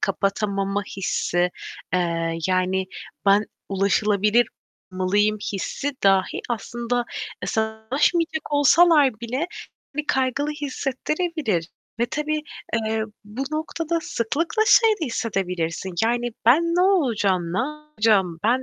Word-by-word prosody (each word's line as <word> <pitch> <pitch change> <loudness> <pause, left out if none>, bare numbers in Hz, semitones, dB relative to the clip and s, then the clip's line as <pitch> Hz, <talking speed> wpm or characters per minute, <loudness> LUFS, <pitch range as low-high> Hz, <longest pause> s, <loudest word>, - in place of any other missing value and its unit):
kapatamama 200 0 0
hissi, 180 -2 0 0.4
eee, 165 -2 0
yani 185 0 +1 0.4
"Ben 200 +2 +5 0.2
ulaşılabilir 210 +3 +2 0.5
olmalıyım" 205 +3 +1
hissi 265 +8 -3
dahi 195 -1 +3
aslında, 240 +2 -2 0.4
eee, - - -2
sana 220 0 -2
ulaşmayacak 315 +2 +1
olsalar 290 -4 +5
bile 250 +7 -2 0.5
seni 300 0 -2
kaygılı 265 +3 0
hissettirebilir 285 - -2 0.3
ve 235 - +3
tabii, 300 +3 -2 0.4
eee, 220 0 0 0.2
bu 210 +6 -5
noktada 325 +1 -2
sıklıkla 325 - 0
şeyi 450 -1 +6
de - - +1
hissedebilirsin; 185 -6 -2
yani 240 +1 0
"Ben 260 +8 +6
ne 335 +1 +1
olacağım, 215 - +2
ne 185 - 0
yapacağım? 230 - 0
Ben, 245 +4 +3
230 Hz, 110 wpm, -23 LUFS, 195-295 Hz, 0.5 s, şeyi